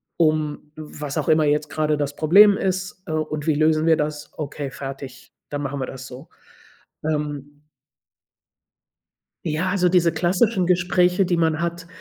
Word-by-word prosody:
um 155 -2 0
was 150 -2 -6
auch - - -2
immer 155 0 +4
jetzt 150 0 +1
gerade 155 -1 0
das 145 -1 -3
Problem 200 +7 +6
ist, 190 0 -3
äh, - - -4
und 155 -1 -3
wie 155 - +3
lösen 155 +1 +2
wir 160 -1 +4
das, 150 0 -3
okay 145 -2 -5
fertig, 135 -1 -9 0.2
dann 145 0 -4
machen 140 0 -4
wir 130 - -2
das 130 0 -8
so, 130 +4 -11 0.7
ähm 150 -2 -3 1.9
Ja, 165 +3 -1
also, 180 -2 +2
diese 175 -2 +3
klassischen 185 +2 +1
Gespräche, 180 +1 +2
die 175 -1 0
man 160 -1 +1
hat, 170 0 -3
155 Hz, 155 wpm, -22 LUFS, 145-175 Hz, 1.9 s, Problem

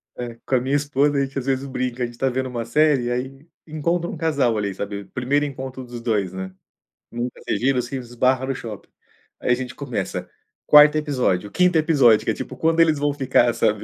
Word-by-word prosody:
É. 120 -1 -6
Com 135 - +1
a 125 - +2
minha 135 +3 0
esposa, 145 0 +1
a 140 - +2
gente 135 +1 -5
às 130 - -7
vezes 135 0 0
brinca, 125 -2 -3
a - - +2
gente 120 0 -9
tá 135 - +2
vendo 130 +1 -2
uma 120 -2 -4
série, 135 -1 +2
aí 135 +4 -5 0.2
encontra 170 +2 -1
um - - -5
casal 145 -7 +1
ali, 100 -2 -2
sabe? 100 +1 -5
Primeiro 130 +8 0
encontro 130 -2 -6
dos 120 -1 -8
2, 105 -6 0
né? 95 0 -6 0.6
Nunca 120 +1 -5
se - - 0
viram 130 0 +1
e - - +2
se 125 +3 -5
esbarra 125 +1 0
no 135 0 -2
shopping. 110 -4 -8 0.5
Aí - - 0
a - - +7
gente 125 0 -4
começa. - - -4 0.4
4º 150 0 +8
episódio, 125 -10 0
5º 180 -2 +3
episódio, 140 -9 +4
que - - 0
é - - -1
tipo: 130 - -7
"Quando 165 +5 +1
eles 160 -2 +4
vão 145 0 0
ficar", 130 -4 +2
sabe? 105 -1 0
130 Hz, 220 wpm, -22 LUFS, 120-145 Hz, 0.6 s, 4º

